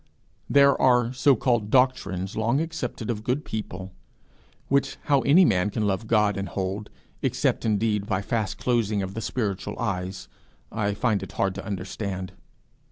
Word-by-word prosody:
There 140 -1 +5
are 125 -1 +4
so 130 +1 +4
called 115 -3 0
doctrines 105 -8 +1
long 115 +5 +1
accepted 140 -8 -3
of 105 -2 -5
good 130 +6 -1
people, 95 -3 -5 0.8
which 140 0 +1
how 140 -2 +3
any 160 +8 +5
man 95 - +2
can 105 0 -1
love 100 +2 -1
God 105 -3 +3
and 100 0 -3
hold, 100 +2 -3 0.3
except - - 0
indeed 105 -1 +1
by 100 -3 -1
fast 110 -2 -2
closing 110 -5 0
of 95 0 -5
the 115 - -4
spiritual 105 -5 -3
eyes, 95 -4 -3 0.4
I 100 -1 -1
find 110 -3 +1
it - - -8
hard 95 - 0
to 100 - -7
understand. 95 -1 -4
105 Hz, 160 wpm, -25 LUFS, 100-125 Hz, 0.8 s, There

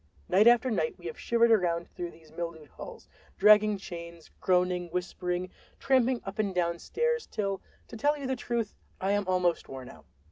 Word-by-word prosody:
Night 210 +4 +5
after 240 +1 +5
night 415 - -1
we - - -16
have 465 - -6
shivered 235 0 +3
around 175 -5 +2
through 175 -2 -6
these 160 -2 -18
mildewed 165 -3 -6
halls, - - -10 0.3
dragging 210 0 +6
chains, 170 -3 -9
groaning, 180 -1 +2
whispering, 180 +1 -3 0.3
tramping 260 -2 +2
up 195 +2 -7
and 200 -3 0
down 170 -1 0
stairs, 475 - -1
till, 195 -3 -2 0.3
to - - -10
tell 290 +6 +1
you 280 - -6
the 260 0 0
truth, 235 -3 -2 0.3
I 190 +1 0
am 205 -1 0
almost 180 -2 +1
worn 130 -2 -8
out. - - -15
195 Hz, 180 wpm, -29 LUFS, 175-235 Hz, 0.3 s, dragging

